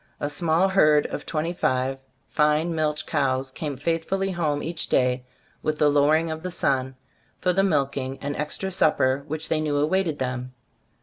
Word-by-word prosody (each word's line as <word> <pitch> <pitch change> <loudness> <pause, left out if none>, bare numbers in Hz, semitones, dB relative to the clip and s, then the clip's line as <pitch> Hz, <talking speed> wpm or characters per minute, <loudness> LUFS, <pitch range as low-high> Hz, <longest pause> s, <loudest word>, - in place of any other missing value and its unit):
A 145 - -2
small 165 +4 +2
herd 150 -6 +4
of - - -5
twenty 165 +2 -1
five 130 -5 0 0.3
fine 150 +3 +2
milch 155 -1 -1
cows 130 -3 0
came 145 0 -5
faithfully 165 +6 -1
home 155 -5 -1
each 165 +1 -3
day 125 0 +2 0.4
with 155 0 -1
the 150 - +4
lowering 155 +3 +3
of 160 0 -5
the 185 - -4
sun, 130 -5 0 0.4
for 180 - +1
the 195 - +3
milking 140 -7 0
and 145 0 -3
extra 150 +6 -3
supper 140 -6 +2
which 155 +1 -4
they 155 -1 0
knew 150 -2 0
awaited 160 +1 +1
them. 125 -1 -3
150 Hz, 170 wpm, -25 LUFS, 135-165 Hz, 0.4 s, herd